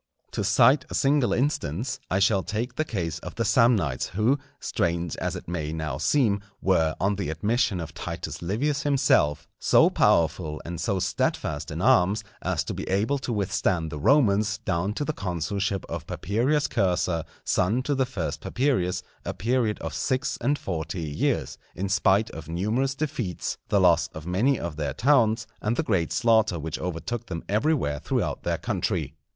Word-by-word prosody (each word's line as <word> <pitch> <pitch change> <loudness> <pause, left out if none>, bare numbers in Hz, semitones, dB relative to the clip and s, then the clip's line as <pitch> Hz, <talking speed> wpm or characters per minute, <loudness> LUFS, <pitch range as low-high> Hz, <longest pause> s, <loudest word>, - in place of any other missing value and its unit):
To - - -2
cite 130 0 +5
a - - -4
single 135 -5 +3
instance, 125 - -1
I 95 - +1
shall 100 0 +3
take 110 +5 -3
the 155 - 0
case 85 - -3
of - - -8
the 115 - 0
Samnites 105 - +3
who, 125 +7 +3 0.2
strange 85 -1 -1
as - - -2
it - - -8
may 80 -3 -3
now 80 -4 -3
seem, 105 - +2 0.2
were 80 -4 +2
on 100 +1 +1
the 100 -6 -2
admission 105 +5 0
of 80 - -6
Titus - - -5
Livius 135 - 0
himself, 130 - +2
so - - +5
powerful 80 -1 +2
and 85 -1 -5
so 95 +3 0
steadfast 95 - -1
in - - -4
arms, 100 +4 +4 0.2
as - - 0
to - - -4
be - - -5
able 110 +9 +1
to 130 - -4
withstand 95 -6 0
the 75 - -5
Romans 105 - +3
down 90 +5 0
to 145 - -2
the 155 - -1
consulship 95 - -2
of - - -6
Papirius 125 - 0
Cursor, 90 -3 0 0.2
son 105 +8 +1
to 145 - 0
the 130 -2 +1
first 100 -11 -4
Papirius, 120 -9 0 0.2
a - - -4
period 115 0 0
of 80 -2 -4
six 130 - -1
and 140 +5 +1
forty 80 - -4
years, 75 -2 -1 0.2
in 95 +3 -2
spite 100 +2 +2
of 80 -1 -9
numerous 110 +11 0
defeats, 135 - -3
the 100 - +3
loss 85 -3 +4
of 80 0 -7
many 110 +9 +2
of 85 -3 -5
their 75 -3 -2
towns, 115 - +3 0.2
and 110 +3 0
the - - +1
great 90 -7 0
slaughter 110 -6 +3
which 80 +1 -4
overtook 90 +7 -4
them 80 - -5
everywhere 105 - +1
throughout - - -1
their - - -1
country. - - -2
100 Hz, 175 wpm, -26 LUFS, 85-120 Hz, 0.2 s, cite